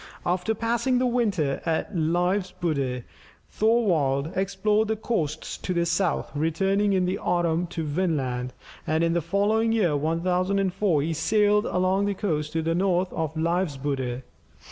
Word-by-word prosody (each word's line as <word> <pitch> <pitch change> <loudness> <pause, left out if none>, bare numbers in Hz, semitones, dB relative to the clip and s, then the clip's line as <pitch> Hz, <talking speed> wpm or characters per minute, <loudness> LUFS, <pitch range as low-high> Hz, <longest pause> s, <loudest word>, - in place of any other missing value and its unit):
After 180 +5 0
passing 235 +3 0
the 255 - +2
winter 205 - 0
at 165 +4 -2
Leifsbudir, 170 -6 0 0.5
Thorvald 165 - +1
explored 200 +3 +1
the 220 - 0
coasts 160 -9 -3
to 180 - -3
the 170 0 +2
south, 175 -1 0
returning 195 +7 +1
in 185 -1 +2
the 180 +1 -1
autumn 175 -1 0
to 165 -1 -4
Vinland, 145 -6 -1 0.4
and 160 +2 +1
in 165 0 +2
the 170 - +1
following 205 +6 +1
year 190 -9 +2
1004, 180 +2 +1
he 165 +2 -1
sailed 210 +5 +2
along 185 +2 +1
the 200 - -1
coast 155 -7 -2
to 165 0 0
the 165 +1 0
north 180 0 +1
of 160 -1 -3
Leifsbudir. 145 -7 -1
175 Hz, 145 wpm, -25 LUFS, 155-200 Hz, 0.5 s, the